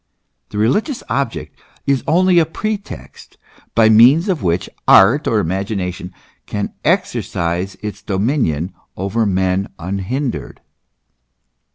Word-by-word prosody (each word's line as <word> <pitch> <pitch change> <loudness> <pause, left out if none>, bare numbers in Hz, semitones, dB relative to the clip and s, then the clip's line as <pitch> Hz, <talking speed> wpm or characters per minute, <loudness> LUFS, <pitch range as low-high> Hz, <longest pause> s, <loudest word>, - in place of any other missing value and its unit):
The - - -7
religious 210 - 0
object 135 -4 -3 0.3
is 140 -2 +1
only 180 +1 +4
a 165 - +3
pretext, 210 +4 -6 0.4
by 110 -1 +5
means 125 - +6
of 180 -6 0
which 85 0 0 0.2
art 110 +10 +6
or 110 - +2
imagination 95 0 -3 0.4
can 105 -1 -3
exercise 85 +3 -1
its 105 -1 -5
dominion 95 - -1 0.2
over 100 +4 0
men 95 0 0
unhindered. 100 - -4
105 Hz, 105 wpm, -18 LUFS, 95-140 Hz, 0.4 s, means